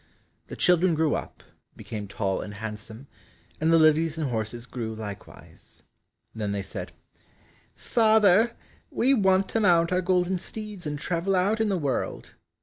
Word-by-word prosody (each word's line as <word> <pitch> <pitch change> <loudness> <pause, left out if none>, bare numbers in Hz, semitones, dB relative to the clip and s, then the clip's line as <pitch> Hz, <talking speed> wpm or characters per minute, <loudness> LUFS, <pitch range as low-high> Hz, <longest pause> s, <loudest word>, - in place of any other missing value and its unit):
The - - -7
children 180 -1 +3
grew 155 -1 +1
up, - - -6 0.3
became 105 -2 -7
tall 100 -1 -2
and 105 -1 -8
handsome, 110 +3 -8 0.5
and 160 +1 +2
the 165 - +6
lilies 160 0 +3
and 150 -5 -2
horses 115 +1 -4
grew 115 -3 -5
likewise. 105 -2 -10 0.5
Then 105 -2 -3
they 100 -1 -3
said, - - -7 0.8
"Father, 220 -1 +3 0.4
we 265 +3 +2
want 190 -4 +3
to 225 - 0
mount 170 -5 +3
our 180 0 +2
golden 180 0 +1
steeds 210 -4 -7
and 150 0 -3
travel 175 +5 -1
out 200 +5 +1
in 220 - +1
the 195 - +1
world." 140 -6 -3
165 Hz, 150 wpm, -26 LUFS, 115-190 Hz, 0.8 s, the